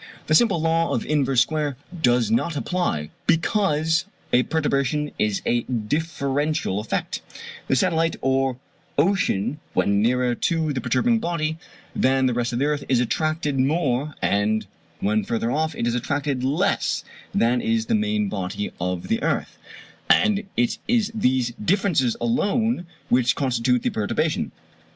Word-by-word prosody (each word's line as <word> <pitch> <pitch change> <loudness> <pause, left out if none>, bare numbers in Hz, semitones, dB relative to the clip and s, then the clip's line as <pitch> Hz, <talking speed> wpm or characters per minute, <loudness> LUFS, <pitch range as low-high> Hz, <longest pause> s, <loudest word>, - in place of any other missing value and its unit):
(The 155 - 0
simple 195 -1 +4
law 165 0 +1
of 120 - -2
inverse 135 -4 +2
square 150 -2 -1 0.2
does 120 -5 +3
not 150 +7 +1
apply, 110 - -1 0.2
because 160 -2 +2 0.3
a 125 - +6
perturbation 150 0 0
is 105 -2 0
a 120 0 +2
differential 140 - -1
effect: 105 - -3 0.5
the - - +2
satellite 165 +5 +1
or 135 -1 +1 0.4
ocean 150 - +1 0.2
when 100 0 +2
nearer 125 +2 +2
to 160 +4 0
the 130 - -2
perturbing 225 - +2
body 165 -4 -2 0.4
than 130 0 +2
the 125 - +2
rest 120 0 -1
of 120 - -2
the 135 - +1
earth, 150 -1 0
is 130 -2 +3
attracted 150 +2 0
more, 140 0 0
and 105 +2 +1 0.4
when 105 +1 +1
further 115 0 -1
off 155 +2 0
it - - -2
is 120 - +1
attracted 140 +2 -1
less 135 +4 +1 0.3
than 120 +1 +2
is 115 0 0
the - - -1
main 105 -1 +1
body 100 0 -3
of 90 0 -2
the 225 +1 0
earth; - - -2 0.5
and 215 -2 +4
it 120 0 +1
is 225 -2 +2
these 130 - +1
differences 175 - +2
alone 230 -4 0 0.2
which 125 0 +3
constitute 125 -2 +1
the - - +1
perturbation.) 105 -1 -1
135 Hz, 145 wpm, -23 LUFS, 120-160 Hz, 0.5 s, a